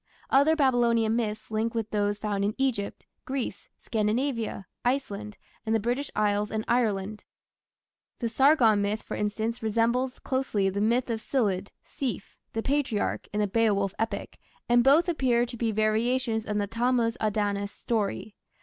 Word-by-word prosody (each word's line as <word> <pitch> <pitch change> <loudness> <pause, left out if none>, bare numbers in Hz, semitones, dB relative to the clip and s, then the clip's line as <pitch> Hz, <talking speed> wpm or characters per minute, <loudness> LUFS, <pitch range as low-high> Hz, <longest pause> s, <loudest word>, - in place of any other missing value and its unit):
Other 285 +4 +5
Babylonian 235 -5 +3
myths 215 -2 -3
link 225 +2 -1
with 225 -2 -2
those 205 -1 0
found 205 -1 -2
in 205 +1 0
Egypt, 250 -7 -1 0.2
Greece, 265 -2 -4
Scandinavia, 225 -1 -1 0.2
Iceland, 215 -5 -2 0.3
and 225 -1 0
the - - +3
British 245 +6 -1
Isles 210 0 +1
and 220 0 -3
Ireland. 215 -4 0 0.9
The 235 - -2
Sargon 230 -3 +4
myth, 205 +2 -1
for - - -7
instance, 220 +3 -2
resembles 235 +4 +1
closely 225 -7 0
the 200 +2 -2
myth 235 +3 +2
of 225 -1 -2
Scyld 205 -7 0 0.2
(Sceaf), 260 -8 -4 0.2
the 225 - -2
patriarch, 270 -7 0
in 210 - 0
the 205 - +2
Beowulf 200 -2 +1
epic, 225 0 -3 0.3
and 240 0 +5
both 295 +7 +5
appear 255 -8 +2
to 240 - -7
be 230 -1 0
variations 220 +2 +1
of 210 -1 -1
the 205 - +1
Tammuz 230 +1 +1
Adonis 205 -1 0
story. 215 -2 -2
225 Hz, 150 wpm, -27 LUFS, 210-245 Hz, 0.9 s, Other